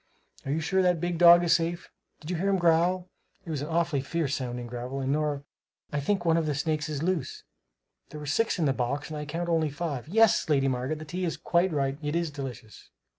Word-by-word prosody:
Are - - -1
you 160 +3 0
sure 190 +4 +1
that 180 -2 +2
big 175 0 -2
dog 175 0 +8
is 170 - +4
safe? 170 +1 -1 0.3
Did 160 +2 -6
you 180 - -1
hear 195 +4 0
him 195 - +3
growl? 175 +1 +2 0.4
It 165 - -5
was 150 -3 -2
an 145 - -4
awfully 165 -3 0
fierce 145 0 -2
sounding 125 -3 -3
growl! 125 +3 -5
And, 135 0 -1
Nora, 150 -1 -1 0.5
I 150 - +1
think 175 +5 -1
one 165 -1 +4
of 160 -2 0
the 150 - 0
snakes 155 +1 -1
is 150 -1 -3
loose. 175 -5 -2 0.7
There 150 - -8
were 150 - -7
six 210 +12 +1
in 165 - +1
the 135 - +2
box 135 +4 -2
and 155 - -4
I 150 - -5
can 165 +4 -4
count 175 - -3
only 160 -2 +2
five 145 -3 -4
yes, 220 0 +3
Lady 135 -2 +3
Margaret, 130 +3 -1
the 155 - -8
tea 180 +5 -4
is 170 - -2
quite 175 +2 +1
right. 140 -2 -1
It 150 +1 -2
is 170 -2 0
delicious." 125 -6 -8
155 Hz, 240 wpm, -28 LUFS, 140-170 Hz, 0.7 s, dog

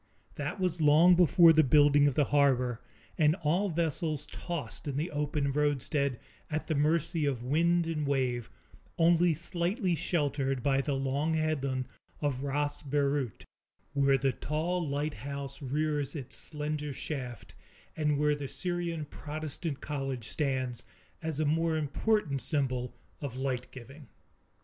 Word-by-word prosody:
That - - -4
was 180 -3 0
long 155 +4 +7
before 170 -1 +7
the 155 0 +5
building 145 +1 +5
of 140 - 0
the 150 - +4
harbor, 125 -4 +3 0.4
and 155 0 +5
all 175 +4 +1
vessels 160 -2 -1
tossed 170 -3 -6
in 140 -1 -2
the 160 +5 -2
open 145 -1 -1
roadstead, 140 -2 0 0.3
at 155 0 -2
the 160 - -1
mercy 155 +2 +1
of 125 -4 -2
wind 170 +6 +2
and 155 -3 -2
wave, 125 -4 0 0.5
only 170 0 +4
slightly 175 - -1
sheltered 145 -5 -1
by 135 -1 +3
the 140 0 -1
long 140 +4 0
headland 140 -5 0 0.3
of 140 -3 -1
Ras 145 +1 -1
Beirut, 140 -4 -1 0.5
where 140 -1 +4
the 135 0 +1
tall 160 +5 -2
lighthouse 140 -1 -4
rears 145 +1 -1
its 135 -4 -5
slender 150 -1 -4
shaft, 130 -4 -6 0.4
and 150 -2 +1
where 150 0 +3
the 145 -1 -4
Syrian 175 -1 -3
Protestant 150 0 -5
College 135 -6 -4
stands, 130 -5 -1 0.4
as 160 -3 -3
a 155 - +2
more 160 +2 +1
important 150 -1 0
symbol 130 -2 -1 0.3
of 140 -4 -5
light 130 -2 -2
giving. 135 +3 -12
145 Hz, 140 wpm, -30 LUFS, 135-160 Hz, 0.5 s, long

